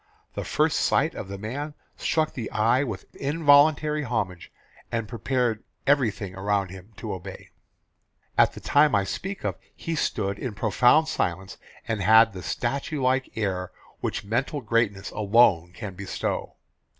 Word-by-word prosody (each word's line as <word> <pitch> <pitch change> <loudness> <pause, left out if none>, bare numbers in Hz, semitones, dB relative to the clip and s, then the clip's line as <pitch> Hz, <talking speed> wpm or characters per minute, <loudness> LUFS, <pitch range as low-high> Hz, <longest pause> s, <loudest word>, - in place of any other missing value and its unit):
The - - -4
first - - +1
sight - - +2
of - - -6
the 100 0 -6
man 140 +9 -5 0.2
struck 155 -1 0
the 115 -4 -5
eye 115 +5 +2
with 110 -9 -5
involuntary 150 +1 +4
homage 100 - -3 0.4
and 115 -2 -2
prepared 120 0 -1 0.2
everything 110 -9 +1
around 100 0 -1
him 95 +3 -11
to 110 - -5
obey. 95 0 -9 0.9
"At - - +4
the - - -10
time 145 -3 +4
I 100 - +3
speak 195 - -5
of - - -1 0.2
he 165 - -4
stood 100 -9 -1
in 120 -5 -4
profound 120 +9 +4
silence 95 - -2 0.3
and 110 -3 -1
had 110 +2 +6
the 95 - -7
statue 140 - -2
like 130 -1 0
air 95 -4 -2 0.3
which 100 - -3
mental 125 +7 -1
greatness 110 -4 0
alone 100 -5 +3
can 100 +1 -7
bestow. 95 +1 -4
110 Hz, 150 wpm, -26 LUFS, 100-135 Hz, 0.9 s, had